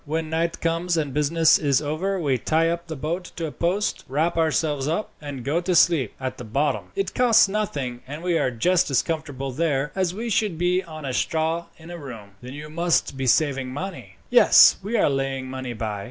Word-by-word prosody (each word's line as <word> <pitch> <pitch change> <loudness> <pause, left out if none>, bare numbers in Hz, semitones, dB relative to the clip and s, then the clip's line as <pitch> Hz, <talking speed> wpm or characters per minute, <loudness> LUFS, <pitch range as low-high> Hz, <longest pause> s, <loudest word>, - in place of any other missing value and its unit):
When 160 +1 -3
night 165 +1 -1
comes, 170 +1 0
and 145 -4 -1
business 155 +2 +3
is 140 -3 +2
over, 165 +6 -2
we 140 -6 0
tie 165 +5 +1
up 170 0 -3
the 160 - -5
boat 165 +6 -3
to 165 - -3
a 155 - -4
post, 185 +7 -1
wrap 155 +6 0
ourselves 155 -3 0
up, 170 +7 -2
and 140 -4 -7
go 155 +5 0
to 180 0 0
sleep 160 -9 +3
at 130 -1 -5
the - - -6
bottom. 135 +7 -1
It 395 0 -2
costs 240 -4 +5
nothing, 145 -12 -3
and 150 +4 -7
we 180 -1 +1
are - - +1
just 170 +10 +1
as 135 - +2
comfortable 145 -5 -4
there 145 -1 -1
as 185 -2 0
we 225 +5 -5
should 200 -5 0
be 180 +2 +1
on 155 -4 -9
straw 160 +5 -1
in 160 +1 -12
a 175 - -7
room." 115 -8 -9
"Then 125 +1 -9
you 150 +1 -8
must 170 -2 0
be 135 -1 -3
saving 135 -1 +2
money." 130 - -7 0.2
"Yes; - - +7
we 220 +5 -2
are - - +3
laying 135 -2 -2
money 130 -1 -5
by. 110 -2 -4
155 Hz, 210 wpm, -23 LUFS, 135-170 Hz, 0.2 s, Yes